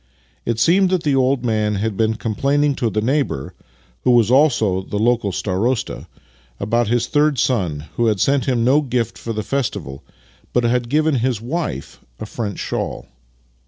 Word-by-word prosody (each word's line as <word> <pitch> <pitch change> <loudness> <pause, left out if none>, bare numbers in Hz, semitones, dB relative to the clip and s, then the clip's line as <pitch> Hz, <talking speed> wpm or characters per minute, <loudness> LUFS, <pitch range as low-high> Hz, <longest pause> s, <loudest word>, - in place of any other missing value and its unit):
It 115 -1 0
seemed 180 +10 +4
that 185 -2 0
the 145 -2 +2
old 130 -1 +1
man 105 -2 +1
had 105 +1 -2
been 110 +1 +1
com]^laining 140 +6 0
to 115 - 0
the 105 0 -1
neighbour 130 - -1 0.5
(who - - +2
was 120 -2 +4
also 120 -9 +3
the 100 - -5
local 115 -2 +1
starosta 105 +7 -2 0.3
') - - -33
about 115 +3 +1
his 120 +1 +1
third 150 0 +2
son, 90 - 0 0.2
who 120 - +2
had 105 -3 +1
sent 135 +3 +2
him 125 -3 +1
no 140 +4 +4
gift 125 -5 -2
for 115 - -6
the 110 -1 -3
festival, 110 - -3 0.5
but 125 - +2
had 120 0 0
given 155 0 +2
his 120 -2 0
wife 150 +9 -4 0.2
a - - -5
French 105 -4 -5
shawl. - - -4
120 Hz, 175 wpm, -20 LUFS, 105-135 Hz, 0.5 s, seemed